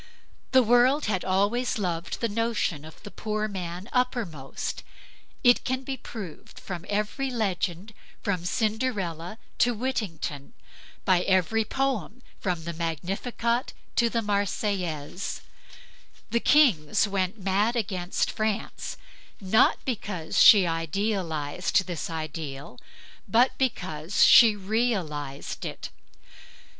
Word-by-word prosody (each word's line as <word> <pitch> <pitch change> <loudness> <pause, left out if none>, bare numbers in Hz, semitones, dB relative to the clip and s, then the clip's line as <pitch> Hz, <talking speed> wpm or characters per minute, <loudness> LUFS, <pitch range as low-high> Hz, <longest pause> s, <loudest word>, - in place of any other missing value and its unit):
The 260 -1 +6
world 245 +5 +4
had 195 -4 0
always 205 +7 +1
loved 175 -4 -3
the 230 - +2
notion 210 -8 -1
of 160 - -13
the 205 - -9
poor 215 0 -2
man 180 -1 -6
uppermost; 225 - -2 0.6
it 245 -1 +5
can 260 +1 -2
be 270 0 -3
proved 210 - -9
by 180 -3 -4
every 210 +7 -1
legend 200 -3 -2 0.3
from 185 -4 -1
Cinderella 210 -4 -2 0.2
to 245 -1 +3
Whittington, 180 - -3 0.5
by 185 -2 +4
every 190 +4 +2
poem 255 - -2 0.2
from 180 -4 -2
the 170 +1 -4
Magnificat 195 - -2 0.2
to 235 -1 +4
the 230 0 -1
Marseillaise. 195 -5 -2 0.9
The 235 - +3
kings 220 - +4
went 195 +1 -1
mad 200 +4 +1
against 190 -5 -1
France 215 -2 -3 0.4
not 210 +4 +3
because 200 -9 -1
she 200 -4 +9
idealized 165 -1 -1
this 175 -3 -4
ideal, 150 -5 -6 0.5
but 235 +6 +3
because 180 - 0
she 225 -3 +8
realized 190 - -2
it. - - -6
200 Hz, 110 wpm, -27 LUFS, 170-230 Hz, 0.9 s, she